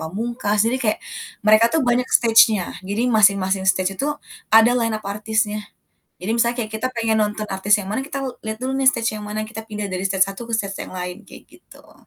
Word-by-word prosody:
Pamungkas, 210 +4 -1
jadi 240 +3 +1
kayak 215 -3 0 0.5
mereka 215 +2 +6
tuh 320 0 0
banyak 245 +1 +1
stage-nya. 225 -6 +4
Jadi 220 +6 -1
masing-masing 195 -2 +3
stage 190 0 +1
itu 285 - 0 0.4
ada 225 +2 +6
line 230 -3 0
up 215 - -11
artisnya. 210 +1 -1 0.6
Jadi 185 +5 -4
misalnya 235 +1 +1
kayak 215 - -13
kita 255 - +1
pengen 225 -1 +1
nonton 210 0 -2
artis 200 +1 +2
yang 205 - -5
mana 265 - -1
kita 280 0 -6 0.2
lihat 220 0 -5
dulu 260 +2 -3
nih 270 -1 +4
stage 230 -3 -2
yang 215 - -6
mana, 210 +1 -4
kita 220 0 -8
pindah 210 -1 -4
dari 185 -2 -4
stage 190 -1 +2
satu 195 +4 -8
ke - - -5
stage 200 -2 -3
yang - - -8
lain, 180 +3 -6
kayak 205 - -15
gitu. - - -19
215 Hz, 210 wpm, -21 LUFS, 200-230 Hz, 0.6 s, mereka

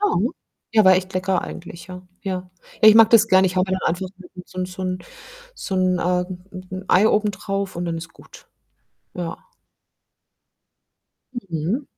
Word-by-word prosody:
Ja. 415 +1 +2 0.6
Ja, 215 -2 +6
war 185 - +8
echt 185 +1 -2
lecker 185 0 0
eigentlich, 170 0 -9
ja. 180 0 -8 0.2
Ja. 185 -2 -4 0.3
Ja, 215 - +9
ich 215 - +8
mag 225 -1 +7
das 225 -1 +6
gerne. 190 0 +5
Ich 185 +1 -3
haue 185 - +3
mir 190 - -3
dann - - 0
einfach 180 +2 -3
'n 185 -1 -15
'n - - -11
so - - -20
'n 185 - 0
so 185 +1 -8
'n 185 0 -2 0.6
so 195 - -5
'n, 185 -1 +2
ähm 180 +1 -1
'n 185 0 -9
'n - - -19
Ei 200 +4 +5
oben 210 0 +2
drauf 195 0 -4
und 175 - -3
dann 165 -1 -2
ist 165 0 -8
gut. - - -17 0.7
Ja. 175 -2 -4 2.1
Mhm. 170 - -2
185 Hz, 190 wpm, -22 LUFS, 180-195 Hz, 2.1 s, Ja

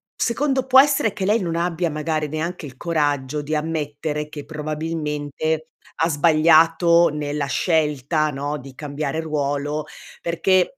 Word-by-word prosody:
secondo 265 +2 0
può 265 0 +7
essere 275 -7 +1
che 205 - -4
lei 210 +4 +3
non 170 -4 -2
abbia 170 -1 -1
magari 155 0 -2
neanche 160 +3 -4
il 135 -3 -11
coraggio 145 -3 -1
di 155 +2 -2
ammettere 150 -1 -3
che 150 -1 -8
probabilmente 155 0 -3 0.3
ha 165 - +2
sbagliato 165 +2 +5
nella 150 -1 -3
scelta, 155 -1 +1
no, 145 +2 -3
di 135 -1 -11
cambiare 145 +2 -4
ruolo, 150 -1 -2 0.3
perché 185 +7 +1
155 Hz, 135 wpm, -22 LUFS, 145-170 Hz, 0.3 s, può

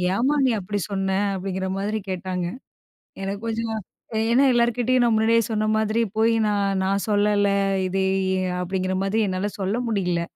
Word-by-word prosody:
ஏம்மா, 265 +7 +2
நீ - - +3
அப்டி 205 +2 -3
சொன்ன?" 195 -1 -1 0.3
அப்டிங்கிற 190 0 -3
மாதிரி 205 +2 -1
கேட்டாங்க. 185 -1 -3 0.8
எனக்கு 195 +1 -3
கொஞ்சம் 225 0 -2 0.4
ஏ - - +1
ஏன்னா, 270 +4 +5
எல்லார்கிட்டயும் 240 +1 +2
நான் 235 - +3
முன்னாடியே 225 +1 +3
சொன்ன 215 0 0
மாதிரி, 220 +1 +1
போயி, 225 +1 +3
"நான் 200 -2 0
நான் 195 +1 0
சொல்லல, 205 -1 +2 0.4
இது 190 +1 -1 0.5
எ"அப்டிங்கிற 185 +1 -2
மாதிரி 195 +3 0
என்னால 185 +2 -1
சொல்ல 195 +4 -1
முடியல. 180 -6 0
205 Hz, 150 wpm, -23 LUFS, 190-225 Hz, 0.8 s, ஏன்னா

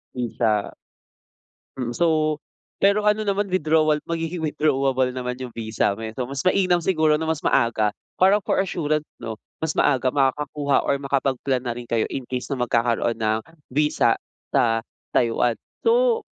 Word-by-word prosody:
Dun 125 -2 -2
sa 105 -2 +1 1.1
Mm, 120 -1 -3
so 155 -1 +2 0.5
pero 200 +1 +3
ano 210 +1 +3
naman, 205 0 0
withdrawal 155 -4 +2
magiging 165 +1 -2
withdrawable 135 -4 +1
naman 125 0 -4
yung 125 -2 -7
visa 110 -3 0
mo, 110 - -9
eh, 110 0 -4
so 125 - -1
mas 135 +1 -4
mainam 185 -2 +3
siguro 160 -3 +2
na 160 +1 -2
mas 160 -2 0
maaga 110 -5 +2 0.2
para 195 +3 +5
for - - 0
assurance, 155 -5 0 0.2
'no, 110 -1 -5 0.2
mas 160 -1 0
maaga 130 -3 +3
makakakuha 140 +1 +1
or 140 - +1
makapag-plan 135 -1 0
na 120 -2 -4
rin 120 - -7
kayo 115 -1 0
in 135 - -4
case 125 -1 -4
na 140 - -2
magkakaroon 120 -1 +1
ng 110 0 +1 0.3
visa 150 +3 +2 0.3
sa 115 -1 +2 0.3
Taiwan. 120 0 +2 0.3
So, 470 -1 +3
140 Hz, 155 wpm, -23 LUFS, 120-160 Hz, 1.1 s, para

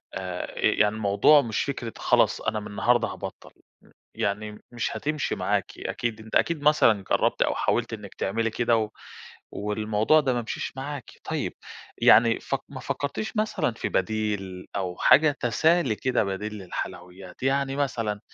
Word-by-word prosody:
آآ، 90 -1 -5
يعني 105 0 +3
الموضوع 110 +8 +5
مش 115 -5 -1
فكرة 120 -5 -4
خلاص - - +2
أنا 110 - -1
مِن 105 - -8
النهارده 120 +3 +2
هابطّل، - - -8
م - - -28 0.5
يعني 105 +1 -3
مش 120 -1 -2
هتمشي 155 0 -2
معاكِ. - - 0
أكيد 115 -2 -3
أنتِ 110 - -7
أكيد 165 -3 +2
مثلًا 115 -9 +4
جرّبتِ - - +2
أو - - +2
حاولتِ - - 0
إنِّك - - -8
تعملي 115 +3 -1
كده، 115 0 +2
و 110 -1 -1 0.6
والموضوع 105 +7 +2
ده 130 -4 0
ما 120 - -1
مشيش 115 - -4
معاكِ. 135 -1 -6
طيّب، - - -2 0.5
يعني 115 0 +6
فك 135 - -2
ما 135 -2 -8
فكرتيش 140 - -3
مثلًا 215 - 0
في - - -3
بديل، 95 -2 -2
أو 90 -2 -3
حاجة 150 0 +5
تسالي 155 +1 +2
كده 130 -4 +1
بديل 100 +2 -4
للحلويّات، 90 0 -7
يعني 135 0 +1
مثلًا، 115 -7 -1
115 Hz, 155 wpm, -26 LUFS, 105-135 Hz, 0.6 s, يعني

